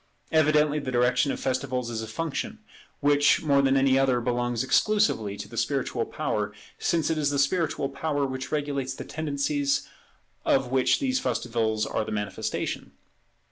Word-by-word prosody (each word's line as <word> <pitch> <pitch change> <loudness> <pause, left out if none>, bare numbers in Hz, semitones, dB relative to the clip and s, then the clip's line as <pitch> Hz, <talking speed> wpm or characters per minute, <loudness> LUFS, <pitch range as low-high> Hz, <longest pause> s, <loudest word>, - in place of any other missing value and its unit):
Evidently 150 -1 +3
the 135 - -5
direction 125 +3 +2
of - - -4
festivals 130 -2 -2
is 110 -1 -3
a 110 - -5
function 155 +7 -3 0.4
which 145 +1 +4
more 140 -3 +4
than 135 0 +3
any 135 0 +4
other 130 -2 +3
belongs 120 0 -1
exclusively 130 - +2
to 100 - -7
the 115 - -11
spiritual 130 -4 0
power, 105 -1 -2 0.3
since 165 -2 +1
it 160 - 0
is 145 -2 +2
the 145 - -1
spiritual 150 0 +1
power 140 +1 -1
which 130 -1 -5
regulates 145 -3 -2
the - - -7
tendencies 145 -2 -1 0.6
of 130 -2 +2
which 130 -1 +3
these 260 -2 +1
festivals 115 - -1
are 110 - -1
the - - -6
manifestation. 105 +1 -3
135 Hz, 160 wpm, -26 LUFS, 120-145 Hz, 0.6 s, which